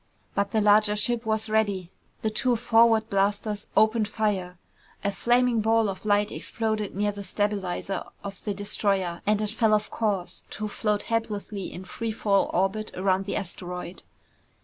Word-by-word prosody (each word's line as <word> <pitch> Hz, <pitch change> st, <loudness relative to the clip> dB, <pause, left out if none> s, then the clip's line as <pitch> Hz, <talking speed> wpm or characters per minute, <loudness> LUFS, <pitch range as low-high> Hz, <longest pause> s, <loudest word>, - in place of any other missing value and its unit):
But 200 Hz, 0 st, 0 dB
the 220 Hz, +1 st, +1 dB
larger 210 Hz, 0 st, +5 dB
ship 235 Hz, +1 st, 0 dB
was 220 Hz, 0 st, 0 dB
ready. 205 Hz, -5 st, 0 dB, 0.3 s
The 220 Hz, -, +1 dB
two 245 Hz, +3 st, +1 dB
forward 225 Hz, -1 st, +4 dB
blasters 205 Hz, +1 st, 0 dB
opened 220 Hz, 0 st, +4 dB
fire. 200 Hz, -5 st, -1 dB, 0.5 s
A 200 Hz, -, +1 dB
flaming 240 Hz, +2 st, +2 dB
ball 225 Hz, 0 st, +3 dB
of 195 Hz, +2 st, -6 dB
light 205 Hz, 0 st, +3 dB
exploded 215 Hz, -3 st, -2 dB
near 205 Hz, +1 st, +1 dB
the 200 Hz, 0 st, -7 dB
stabilizer 195 Hz, -2 st, -2 dB, 0.2 s
of 195 Hz, -1 st, -8 dB
the 205 Hz, -2 st, -2 dB
destroyer 195 Hz, -3 st, -1 dB
and 210 Hz, 0 st, +3 dB
it 210 Hz, -, -1 dB
fell 220 Hz, -1 st, +3 dB
off 210 Hz, 0 st, -2 dB
course 205 Hz, -5 st, -1 dB
to 215 Hz, -, -2 dB
float 210 Hz, 0 st, -1 dB
helplessly 210 Hz, -3 st, -3 dB
in 185 Hz, -, -8 dB
free 225 Hz, +4 st, -4 dB
fall 200 Hz, -2 st, +2 dB
orbit 195 Hz, +4 st, 0 dB
around 190 Hz, +1 st, +1 dB
the -, -, -2 dB
asteroid. 180 Hz, -1 st, -5 dB
210 Hz, 160 wpm, -26 LUFS, 195-220 Hz, 0.5 s, larger